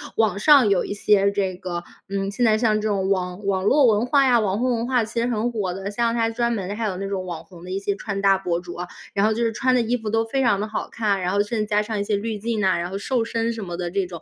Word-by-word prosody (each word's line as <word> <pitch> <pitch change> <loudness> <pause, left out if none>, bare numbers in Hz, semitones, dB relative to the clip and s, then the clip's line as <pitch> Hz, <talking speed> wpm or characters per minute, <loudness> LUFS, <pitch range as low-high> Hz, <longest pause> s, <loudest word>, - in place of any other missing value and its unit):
网 215 -3 +1
上 275 -3 +6
有 195 -3 +2
一 - - -4
些 200 -1 +3
这 195 -2 -1
个， 175 -1 -5 0.2
嗯， 195 0 -2
现 240 +4 0
在 215 -1 +4
像 215 -2 +2
这 215 - -2
种 195 -2 0
网 185 +1 -2
网 195 -1 0
络 280 +4 +5
文 220 -1 +3
化 275 +2 +4
呀， 245 -2 +4
网 205 -1 0
红 255 0 +1
文 230 +2 -2
化， 250 -3 +2
其 220 +2 -4
实 235 - +1
很 235 0 -1
火 200 -6 -2
的， 195 +2 -5
像 230 +2 0
它 230 -1 +1
专 235 +1 0
门 195 -4 -3
的 205 - -3
还 230 - -2
有 200 -3 -2
那 195 +2 -4
种 195 -2 -3
网 170 -3 -6
红 175 0 -14
的 185 - -7
一 190 - -1
些 200 0 -2
穿 200 -2 -4
搭 195 -1 +4
博 175 -2 -2
主 175 -1 -9
啊， 175 +1 -5 0.3
然 200 0 +2
后 220 - +3
就 235 +2 -1
是 230 - +1
穿 255 +3 +1
的 245 - +3
衣 235 +2 0
服 220 -2 -5
都 225 +1 +1
非 245 +4 -1
常 220 -6 +2
地 210 - -1
好 215 - -3
看， 210 -3 0
然 180 0 -1
后 200 - +3
甚 215 +2 -2
至 215 - 0
加 210 0 +1
上 215 0 -4
一 - - 0
些 205 0 0
滤 215 +1 -3
镜 225 +1 -2
呐， 190 -3 +2
然 175 +1 -3
后 195 - -3
瘦 240 +3 0
身 230 0 -1
什 225 -2 -6
么 175 -2 -5
的 175 -1 -3
这 195 0 0
种。 175 -2 -9
210 Hz, 340 characters per minute, -23 LUFS, 195-230 Hz, 0.3 s, 上